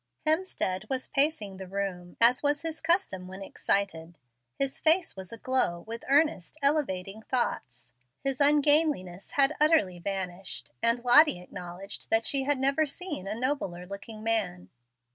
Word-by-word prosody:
Hemstead 310 - 0
was 260 -1 -3
pacing 275 -10 +1
the 190 -1 -8
room, 185 -2 -5
as 240 +2 +5
was 290 +1 0
his 325 -1 -5
custom 330 - 0
when 190 +1 -9
excited. 175 -5 -1 0.4
His 275 0 -2
face 330 +2 +3
was 190 -1 -9
aglow 230 -7 0
with 230 +3 -8
earnest, 285 - +1
elevating 220 -9 0
thoughts. 125 - -3 0.3
His 270 0 -1
ungainliness 290 - +3
had 280 +1 +4
utterly 300 - +2
vanished; 190 0 -3
and 235 +1 +1
Lottie 245 - +6
acknowledged 180 +2 -9
that 225 0 +2
she 275 -1 +1
had 290 0 +2
never 275 +4 +1
seen 295 - -5
a 210 - -3
nobler 240 -10 -2
looking 200 +3 -9
man. 205 -6 0
225 Hz, 145 wpm, -28 LUFS, 185-290 Hz, 0.4 s, Lottie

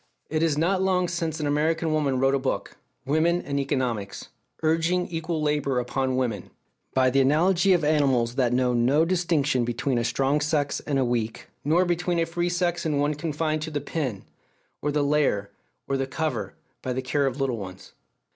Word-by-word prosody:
It 155 0 0
is 160 -3 +2
not 185 +4 +2
long 185 -1 +2
since 165 -2 -2
an 150 - -2
American 160 +3 +1
woman 140 -4 +1
wrote 135 +1 +3
a 140 - +2
book, 130 - -3 0.3
Women 160 +5 +2
and 140 0 -2
Economics, 125 -7 -2 0.3
urging 165 +3 +2
equal 165 -1 -2
labour 145 -3 +1
upon 130 +1 -1
women, 115 -7 -2 0.5
by 130 -1 +4
the 135 +1 +4
analogy 175 +7 +3
of 175 -3 +2
animals 135 -6 +2
that 125 -2 +1
know 125 0 +2
no 130 +7 +3
distinction 165 -7 +1
between 120 +2 -1
a - - 0
strong 135 +4 +1
sex 150 -1 0
and 145 -2 +1
a 130 - +2
weak, 115 -2 -2
nor 165 +5 +3
between 175 0 0
a 165 - +2
free 175 +1 -1
sex 175 -1 0
and 150 -3 0
one 145 +1 +1
confined 155 0 -2
to 160 - -4
the 150 -2 -2
pen, 135 - -3 0.6
or 150 - 0
the 145 0 +1
lair, 140 -9 +1 0.4
or 135 - 0
the 135 0 -1
cover, 150 -3 -3 0.3
by 130 - -2
the 130 +1 -3
care 140 +2 +1
of 135 +1 -3
little 135 -3 0
ones. 95 -2 -9
145 Hz, 190 wpm, -25 LUFS, 130-165 Hz, 0.6 s, by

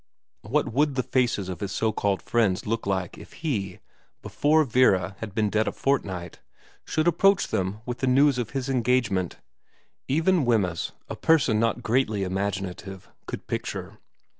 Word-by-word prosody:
What 140 +9 0 0.3
the 130 - 0
faces 120 -8 0
of 90 -3 -5
his 100 -2 -4
so 110 +2 0
called 100 -2 -1
friends 105 -6 +1
would - - -11
look 115 -2 -2
like 95 -3 -2
if - - -13
he, 105 - -3 0.5
before 155 +2 +3
Vera 110 -7 +3
had 105 -4 -7
been 105 -2 +1
dead 110 0 +1
a - - +1
fortnight, 95 -11 -2 0.4
should 155 +1 0
approach 195 +3 +3
them 95 +3 -2
with 120 -1 -4
the 130 - 0
news 135 +1 +4
of 120 - -2
his 135 -1 -3
engagement 120 -8 +1 0.7
even 165 +4 +2
Wemyss, 100 -8 0
a - - -5
person 140 -9 +3
not 115 +1 0
greatly 110 -4 +1
imaginative, 95 0 -4 0.2
could - - -6
picture. - - -5
110 Hz, 160 wpm, -26 LUFS, 95-130 Hz, 0.7 s, news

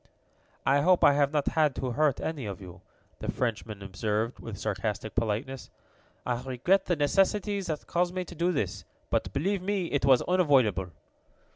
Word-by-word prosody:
"I 140 +2 +4
hope 180 +3 +4
I 145 - +7
have 140 0 +2
not 150 -2 +1
had 155 -4 +2
to 130 - -2
hurt 150 +2 +2
any 150 -8 -3
of 100 -3 -6
you," 90 -3 -11 0.4
the - - -2
Frenchman 110 -4 -3
observed, 105 +4 -2
with 110 -4 -7
sarcastic 110 0 -3
politeness. 115 +4 -2 0.6
"I 120 -1 -1
regret 135 +10 +1
the 175 - +1
necessity 195 +6 +1
that 160 -5 -4
caused 175 +1 0
me 185 -1 -2
to 175 - -10
do 175 +2 +1
this, 105 - -2 0.3
but, - - 0
believe 190 +7 -1
me, 190 -2 -2
it 140 - 0
was 135 -2 +5
unavoidable." 135 - +3
140 Hz, 170 wpm, -28 LUFS, 115-175 Hz, 0.6 s, I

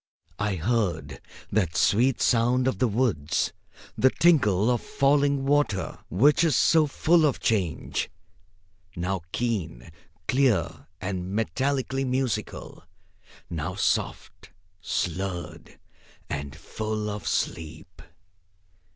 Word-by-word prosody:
I 100 -1 0
heard 105 +1 -1 0.3
that 90 -5 0
sweet 125 +5 +3
sound 125 +2 +3
of 130 - -1
the 125 - +3
woods, 100 - 0 0.4
the 130 - +4
tinkle 125 - +3
of 120 - 0
falling 140 0 +2
water, 140 -9 0
which 145 - +4
is 165 -3 +3
so 160 -2 +4
full 160 +4 +3
of 145 -4 +2
change, 95 -8 -1 0.9
now 90 +1 -2
keen, 90 - -3 0.4
clear 90 - +1
and 95 -1 -4
metallically 135 - -1
musical, 130 -3 -3 0.7
now 80 -4 -4
soft, - - -2 0.3
slurred 90 -1 -4 0.5
and 70 +1 -4
full 110 +6 -4
of 105 0 -5
sleep. 80 0 -3
110 Hz, 100 wpm, -26 LUFS, 90-130 Hz, 0.9 s, the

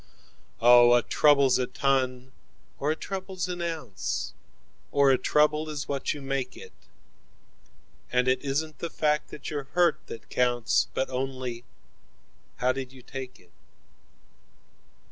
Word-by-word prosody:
5Oh, 120 0 +7
a 120 - +1
trouble's 140 -4 +4
a 125 - 0
ton, 130 -2 0 0.5
or 145 - 0
a 155 - +1
trouble's 190 0 -5
an 175 -1 -4
ounce,6 95 - -3 0.6
Or 140 -1 +4
a 130 - +4
trouble 150 +1 +2
is 150 -3 -5
what 140 -1 -2
you 145 -2 -6
make 135 -2 -3 1.5
it,7And 125 0 +2
it 130 0 +2
isn't 150 +2 -2
the 170 - -3
fact 150 -1 0
that 150 - -8
you're 145 -3 -4
hurt 175 -3 +3
that 115 - -10
counts,8 120 -2 +2
But 130 - -1
only 130 -2 -4 0.9
how 125 +1 +1
did 130 -1 -5
you 130 -1 -15
take 130 0 -8
it? 90 -1 -24
135 Hz, 135 wpm, -27 LUFS, 125-150 Hz, 1.5 s, 5Oh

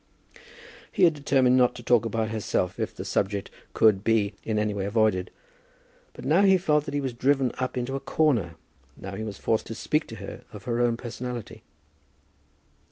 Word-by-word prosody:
He - - +1
had 170 -2 +6
determined 135 -3 +3
not 125 -1 +3
to - - -9
talk 120 -2 +3
about 110 -1 -1
herself 100 -4 -2
if - - -3
the - - -6
subject 100 0 -1 0.2
could 105 -3 +4
be 110 -2 +2
in 110 -1 -1
any 105 0 0
way 100 -1 -3
avoided; 105 -4 +1 0.8
but - - -10
now 160 +7 +4
he 190 -1 +6
felt 150 -5 +1
that 145 - -5
he - - +1
was 135 -3 -3
driven 130 +1 +2
up 130 0 -2
into 125 +2 -2
a - - -2
corner; 120 - +1 0.4
now 95 0 -8
he 105 +3 -5
was 105 -3 -6
forced 110 - 0
to 115 - -6
speak 150 +6 -1
to 115 - -8
her 100 -2 -8
of 105 -2 -10
her 120 +1 -1
own 120 -1 +2
personality. 120 -1 -6
115 Hz, 190 wpm, -26 LUFS, 105-135 Hz, 0.8 s, had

